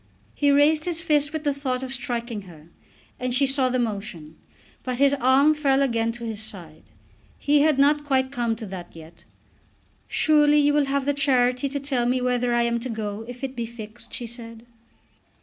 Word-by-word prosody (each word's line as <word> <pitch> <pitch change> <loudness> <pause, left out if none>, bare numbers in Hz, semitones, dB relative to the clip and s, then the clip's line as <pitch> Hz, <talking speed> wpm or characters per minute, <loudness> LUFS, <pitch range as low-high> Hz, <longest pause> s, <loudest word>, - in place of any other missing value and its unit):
He 290 - +1
raised 295 +2 +4
his 345 -2 -1
fist 300 -3 +1
with 315 -1 -4
the 290 -2 +1
thought 265 -2 -3
of 260 0 -5
striking 240 -3 -4
her, 160 -1 -15 0.5
and 250 -1 -2
she 275 +2 +4
saw 270 -1 +2
the 255 - 0
motion. 200 -9 -4 0.5
But 255 -1 -4
his 280 +1 +4
arm 275 +3 +4
fell 280 -2 +2
again 230 -3 0
to 240 0 -10
his 220 -2 -4
side. 180 -8 -7 0.6
He 290 0 +2
had 305 -2 +3
not 295 +2 +3
quite 265 -2 0
come 235 -4 -1
to 220 0 -8
that 185 -4 -9
yet. 160 0 -14 0.8
"Surely 295 -1 +3
you 290 0 +3
will 295 -1 +3
have 275 0 -1
the 285 - +1
charity 260 -1 +2
to 280 +1 -3
tell 265 -4 -1
me 255 +1 +1
whether 250 -1 0
I 240 0 +2
am 235 0 0
to 255 +2 -6
go, 215 -1 -5
if 245 +2 -10
it 265 0 -4
be 235 -1 -3
fixed," 225 0 -10
she 240 - -5
said. 230 -1 -9
255 Hz, 200 wpm, -24 LUFS, 230-280 Hz, 0.8 s, raised